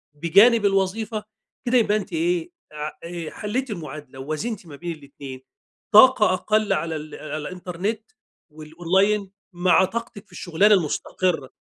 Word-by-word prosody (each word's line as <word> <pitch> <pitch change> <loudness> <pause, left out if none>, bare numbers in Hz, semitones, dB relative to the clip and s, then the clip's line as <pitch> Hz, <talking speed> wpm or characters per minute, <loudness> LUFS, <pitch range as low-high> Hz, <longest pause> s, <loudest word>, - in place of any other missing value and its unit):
بجانب 205 +8 +5
الوظيفة 200 +3 0 0.4
كده 250 +1 +3
يبقى 215 -2 +3
أنتِ 200 - -6
إيه، 345 +1 0 0.2
ع 150 0 -4
آآ، 170 -2 -6
حلّيتي 230 +3 -3
المعادلة 150 -5 -9
ووازنتي 170 - -4
ما 145 - -10
بين 170 +4 -5
الاتنين. 140 -2 -10 0.5
طاقة 215 -3 +7
أقل 210 +2 +1
على 160 0 -2
ال 155 0 -7
على 155 0 -6
الإنترنت 185 +6 -5 0.4
والأونلاين 185 +6 0 0.2
مع 180 +1 +4
طاقتِك 230 -1 -6
في - - -30
الشغلانة 195 +5 +3
المستقرة. 165 -3 -1
185 Hz, 135 wpm, -23 LUFS, 155-215 Hz, 0.5 s, طاقة